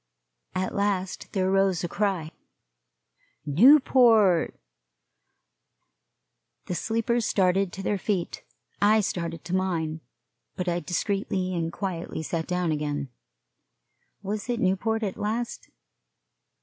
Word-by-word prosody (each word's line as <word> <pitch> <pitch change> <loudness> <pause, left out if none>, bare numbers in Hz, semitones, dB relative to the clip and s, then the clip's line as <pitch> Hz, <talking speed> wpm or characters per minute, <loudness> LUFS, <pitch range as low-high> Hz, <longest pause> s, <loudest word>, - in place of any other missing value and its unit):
At 185 0 -1
last 195 -2 -2
there 190 -1 +1
rose 195 -3 +2
a - - 0
cry 185 -5 -1 1.1
Newport! 225 - +5 2.1
The - - -3
sleepers 230 +4 0
started 190 -1 +2
to 195 - -7
their 200 +1 0
feet. 185 -3 -2 0.4
I 215 +2 +5
started 170 -4 -4
to 175 +1 -2
mine, 165 -4 -1 0.5
but 180 - -3
I 175 0 +1
discreetly 185 0 -2
and 165 -2 -2
quietly 170 -4 -4
sat 160 +1 -3
down 180 -2 0
again. 145 -2 -2 1.1
Was 205 +3 -4
it 240 -1 0
Newport, 220 +4 0
at 195 -3 -3
last? 230 +3 -3
190 Hz, 110 wpm, -26 LUFS, 170-210 Hz, 2.1 s, Newport